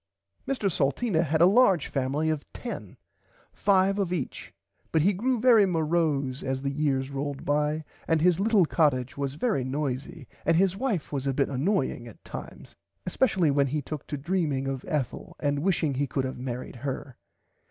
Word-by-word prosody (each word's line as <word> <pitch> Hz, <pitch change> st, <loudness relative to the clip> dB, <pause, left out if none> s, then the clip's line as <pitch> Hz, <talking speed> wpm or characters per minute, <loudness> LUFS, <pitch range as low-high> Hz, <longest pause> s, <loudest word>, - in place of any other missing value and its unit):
Mr 260 Hz, -7 st, 0 dB
Salteena 160 Hz, -, +1 dB
had 160 Hz, 0 st, 0 dB
a -, -, +9 dB
large 195 Hz, -, +5 dB
family 140 Hz, +4 st, 0 dB
of 150 Hz, -2 st, -3 dB
10 240 Hz, -, -7 dB, 0.6 s
five 195 Hz, 0 st, +2 dB
of 190 Hz, -3 st, 0 dB
each 165 Hz, -8 st, -4 dB, 0.4 s
but 160 Hz, -2 st, +3 dB
he 200 Hz, +4 st, +4 dB
grew 245 Hz, +6 st, 0 dB
very 225 Hz, -4 st, +6 dB
morose 155 Hz, -6 st, 0 dB
as 130 Hz, 0 st, -3 dB
the 140 Hz, -, 0 dB
years 140 Hz, -2 st, 0 dB
rolled 140 Hz, 0 st, -4 dB
by 150 Hz, +2 st, +1 dB, 0.2 s
and 160 Hz, -1 st, +3 dB
his 175 Hz, +2 st, +3 dB
little 205 Hz, -3 st, +4 dB
cottage 140 Hz, -6 st, +1 dB
was 140 Hz, -1 st, -3 dB
very 180 Hz, -, 0 dB
noisy 135 Hz, +1 st, -4 dB, 0.2 s
and 165 Hz, +1 st, +3 dB
his 190 Hz, 0 st, +3 dB
wife 215 Hz, -, -2 dB
was 140 Hz, -1 st, -2 dB
a 135 Hz, -, 0 dB
bit 140 Hz, -, +1 dB
annoying 135 Hz, -, -1 dB
at 115 Hz, -, -14 dB
times -, -, -9 dB, 0.3 s
especially 180 Hz, -, +2 dB
when 140 Hz, 0 st, +2 dB
he 150 Hz, +3 st, -1 dB
took 150 Hz, +1 st, -6 dB
to 145 Hz, -, -4 dB
dreaming 150 Hz, -3 st, -1 dB
of 135 Hz, -1 st, -3 dB
Ethel 145 Hz, -5 st, -3 dB
and 145 Hz, -1 st, 0 dB
wishing 165 Hz, -3 st, +1 dB
he 140 Hz, +2 st, -1 dB
could 135 Hz, +1 st, -1 dB
have 130 Hz, -1 st, -5 dB
marrid 125 Hz, 0 st, -5 dB
her. 135 Hz, 0 st, -5 dB
150 Hz, 175 wpm, -27 LUFS, 135-180 Hz, 0.6 s, a